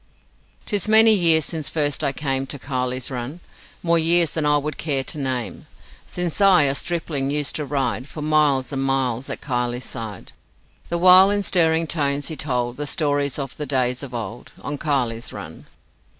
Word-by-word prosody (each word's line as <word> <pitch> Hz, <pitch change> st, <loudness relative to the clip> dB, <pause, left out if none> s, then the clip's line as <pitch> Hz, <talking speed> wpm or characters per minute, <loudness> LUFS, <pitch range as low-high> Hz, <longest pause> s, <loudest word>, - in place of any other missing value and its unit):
'Tis 205 Hz, -1 st, -1 dB
many 220 Hz, +1 st, +7 dB
years 165 Hz, -5 st, +4 dB
since 160 Hz, -4 st, -3 dB
first 145 Hz, -2 st, -1 dB
I -, -, +1 dB
came 135 Hz, -1 st, -2 dB
To 145 Hz, -, -6 dB
Kiley's 125 Hz, -1 st, -3 dB
Run, 130 Hz, +6 st, -6 dB, 0.4 s
More 170 Hz, -1 st, +3 dB
years 165 Hz, -1 st, +3 dB
than 155 Hz, -2 st, 0 dB
I 150 Hz, 0 st, +4 dB
would 150 Hz, +1 st, -5 dB
care 140 Hz, -4 st, -1 dB
to 155 Hz, -, -5 dB
name 125 Hz, -8 st, -3 dB, 0.4 s
Since 180 Hz, +1 st, -3 dB
I, 190 Hz, -6 st, +6 dB
a 135 Hz, -1 st, +2 dB
stripling, 150 Hz, -3 st, -3 dB
used 145 Hz, 0 st, 0 dB
to 150 Hz, -, -4 dB
ride 135 Hz, -2 st, -2 dB
For 150 Hz, -, -8 dB
miles 150 Hz, -4 st, +2 dB
and 135 Hz, -, -1 dB
miles 135 Hz, -2 st, 0 dB
at -, -, -5 dB
Kiley's 125 Hz, -2 st, -2 dB
side, 110 Hz, -4 st, -7 dB, 0.6 s
The 170 Hz, -, -1 dB
while 185 Hz, +2 st, +7 dB
in 205 Hz, 0 st, -1 dB
stirring 165 Hz, -3 st, +2 dB
tones 145 Hz, -2 st, -1 dB
he 160 Hz, -, -5 dB
told 125 Hz, -4 st, -2 dB
The 145 Hz, 0 st, -4 dB
stories 145 Hz, -2 st, 0 dB
of 135 Hz, -3 st, -5 dB
the 150 Hz, -, -5 dB
days 125 Hz, -2 st, 0 dB
of 140 Hz, -3 st, -8 dB
old 115 Hz, +1 st, -7 dB
On 145 Hz, -, -4 dB
Kiley's 125 Hz, -6 st, -1 dB
Run. 85 Hz, -6 st, -10 dB
145 Hz, 180 wpm, -21 LUFS, 130-160 Hz, 0.6 s, many